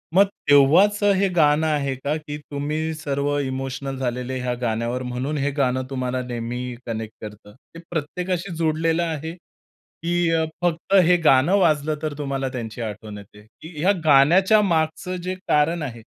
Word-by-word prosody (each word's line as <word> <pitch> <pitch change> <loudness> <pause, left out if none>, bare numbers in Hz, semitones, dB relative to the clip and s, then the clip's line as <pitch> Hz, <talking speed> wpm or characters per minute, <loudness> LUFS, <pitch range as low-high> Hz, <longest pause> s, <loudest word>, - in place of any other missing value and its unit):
मग 200 +1 +7 0.2
तेव्हाचं 195 +9 +5
हे 195 +1 +2
गाणं 155 0 +3
आहे 140 -3 0
का? 140 +4 -2
की 150 -1 -7
तुम्ही 155 +3 -2
सर्व 145 -1 -2
इमोशनल 135 0 -4
झालेले 125 0 -3
ह्या 125 0 -1
गाण्यावर, 120 +2 -1
म्हणून 125 +5 -3
हे 145 +1 0
गाणं 130 -1 +1
तुम्हाला 130 -1 -2
नेहमी 125 +1 -5
कनेक्ट 110 -2 -5
करतं. 105 -1 -10
ते 165 +5 -16
प्रत्येकाशी 175 +3 -3
जोडलेलं 165 +1 +1
आहे 160 0 -4
की 175 -1 -5
अ, 160 -1 +2 0.2
फक्त 175 +2 -1
हे 180 0 +5
गाणं 135 +9 +5
वाजलं, 155 -3 +2
तर 155 -2 -2
तुम्हाला 135 -2 -2
त्यांची 120 -2 -6
आठवण 105 -1 -6
येते, 100 +1 -14 0.2
की 160 -1 -11
ह्या 185 +5 +3
गाण्याच्या 175 +9 +5
मागचं 170 0 0
जे 185 +1 -3
कारण 155 +3 +2
आहे 120 -4 -6
145 Hz, 155 wpm, -22 LUFS, 125-165 Hz, 0.2 s, मग